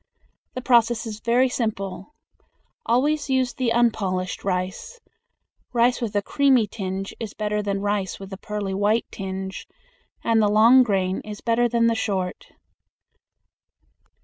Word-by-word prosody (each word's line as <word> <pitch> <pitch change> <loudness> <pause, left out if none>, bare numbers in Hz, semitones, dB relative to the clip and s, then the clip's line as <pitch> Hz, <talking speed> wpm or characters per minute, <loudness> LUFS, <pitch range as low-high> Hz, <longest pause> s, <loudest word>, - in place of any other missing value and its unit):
The 255 - -5
process 235 -2 +3
is 215 -1 -6
very 240 +3 +3
simple. 215 0 -4 0.7
Always 290 +5 +1
use 260 -2 +1
the 245 -1 -1
unpolished 195 -6 0
rice. 190 - -3 0.7
Rice 245 +1 +2
with 215 -3 -3
a 205 - +1
creamy 270 -4 +3
tinge 195 -1 -5
is 220 -3 -6
better 210 0 -1
than 200 -1 -2
rice 205 -2 -2
with 195 0 -9
a - - -6
pearly 205 -1 -4
white 205 +4 +1
tinge, 190 -1 -6 0.6
and 225 -1 +3
the 210 - +3
long 225 +5 +6
grain 190 -5 0
is 210 -1 -8
better 240 +1 +2
than 230 0 +2
the 230 - +3
short. 190 -5 -3
215 Hz, 140 wpm, -23 LUFS, 195-240 Hz, 0.7 s, long